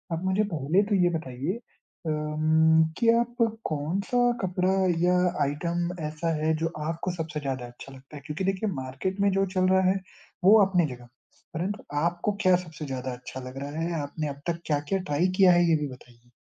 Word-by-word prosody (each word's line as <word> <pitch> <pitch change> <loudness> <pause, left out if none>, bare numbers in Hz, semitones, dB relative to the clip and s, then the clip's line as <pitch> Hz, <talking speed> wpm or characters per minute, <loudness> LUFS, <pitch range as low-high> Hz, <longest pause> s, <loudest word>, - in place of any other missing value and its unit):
आप 165 - -5
मुझे 190 +3 +2
पहले 160 +7 +2
तो 205 - +3
ये 175 - +4
बताइए 145 - -4 0.5
अम 155 +1 +3
कि 230 -1 +3
आप 240 0 -2 0.3
कौन-सा 165 +10 -2 0.2
कपड़ा 185 0 0 0.3
या 180 +1 +4 0.3
आइटम 170 +5 -1 0.2
ऐसा 155 +2 -2
है 155 +1 +1
जो 165 - +2 0.2
आपको 165 +2 -2
सबसे 160 -2 -4
ज़्यादा 130 -3 -3
अच्छा 120 +3 -12
लगता 135 +3 -14
है? 140 - -8
क्योंकि 155 +5 -4
देखिए 195 +2 0
मार्केट 135 +10 -4
में 200 - +4
जो 195 +1 +2
चल 185 0 +3
रहा 190 0 +5
है 190 - +2 0.5
वो 205 +4 +8
अपनी 180 -3 +2
जगह, 120 0 -15 0.5
परंतु 190 +6 -3 0.2
आपको 175 +4 0
क्या 185 -2 +5
सबसे 160 -1 -8
ज़्यादा 130 -2 -4
अच्छा 125 +1 -8
लग 130 - -11
रहा 140 - -5
है, 170 - -1
आपने 150 +2 -4
अब 140 0 -8
तक 170 0 -2
क्या-क्या 150 +5 0
ट्राई 170 +1 0
किया 190 -2 +7
है 175 0 +4
ये 165 - +5
भी 145 - -1
बताइए? 120 -1 -18
160 Hz, 190 wpm, -27 LUFS, 145-185 Hz, 0.5 s, वो